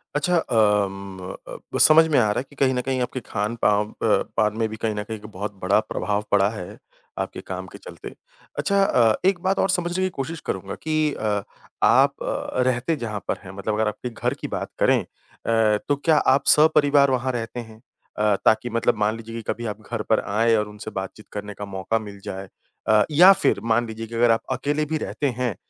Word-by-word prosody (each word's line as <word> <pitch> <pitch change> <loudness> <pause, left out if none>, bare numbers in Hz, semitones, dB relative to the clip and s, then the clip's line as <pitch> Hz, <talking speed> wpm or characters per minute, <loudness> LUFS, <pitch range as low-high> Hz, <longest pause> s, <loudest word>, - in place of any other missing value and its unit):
अच्छा 175 +4 +2
अम, 100 - +1 0.3
अ - - -9
अ, - - -6 0.2
ब - - -1
समझ 160 +1 +8
में 155 - +2
आ - - +4
रहा - - 0
है - - -3
कि 145 - -17
कहीं 135 -1 +2
न 125 - 0
कहीं 130 -1 0
आपके 125 +1 -2
खान-पाव 105 -1 0
अ, - - -15 0.4
पान 105 0 +1
में 115 -1 +1
भी 110 - -7
कहीं 110 -1 -2
न 105 - -3
कहीं 110 +1 -6
एक 105 - -14
बहुत 105 +2 -4
बड़ा 95 +3 +3
प्रभाव 105 +2 -1
पड़ा 100 -1 +4
है 110 0 -8 0.4
आपके - - -4
काम - - -5
के - - -11
चलते। - - -10 0.4
अच्छा 200 -1 +2
अ, 115 - +3
एक 190 -2 -2
बात 190 +2 0
और 195 - +2
समझने 180 0 0
की 185 - +1
कोशिश 160 +4 -4
करूँगा - - -4
कि 155 -1 +1
अ, 105 -2 -1 0.4
आप - - +5
अ, - - -3 0.2
रहते 130 +5 0
जहाँ 110 -7 -4
पर - - -1
हैं, 95 - -9
मतलब 105 +2 -2
अगर 110 0 +1
आपके 105 +4 -4
घर 115 - -2
की - - -3
बात - - -4
करें - - +4
अ, 110 -2 -1
तो 145 - +2
क्या 155 +2 +2 0.2
आप 140 - -2
सहपरिवार 145 -2 +5
वहाँ 130 0 0
रहते 120 0 -4
हैं 110 -2 -10 0.4
अ, 105 -1 +3
ताकि 110 +2 +3
मतलब 115 +1 +1
मान 105 +1 +1
लीजिए 115 0 -9
कि 115 - -4
कभी 120 - -5
आप 110 - -23
घर 120 -2 -2
पर 110 - +4
आएँ 115 +3 +2
और 105 -1 0
उनसे 105 0 -9
बातचीत 95 +3 -10
करने 105 0 -6
का 105 - -7
मौका 100 +3 -2
मिल 100 -2 -10
जाए? 95 0 -6 0.4
अ, 110 -1 +5
या 180 +6 +8
फिर 195 - +1
मान 120 +1 +1
लीजिए 110 0 -7
कि 115 - -8
अगर 120 0 +4
आप 115 - +2
अकेले 150 +2 -1
भी 155 +1 -2
रहते 145 - -2
हैं, 120 -6 0
115 Hz, 225 wpm, -23 LUFS, 105-140 Hz, 0.4 s, समझ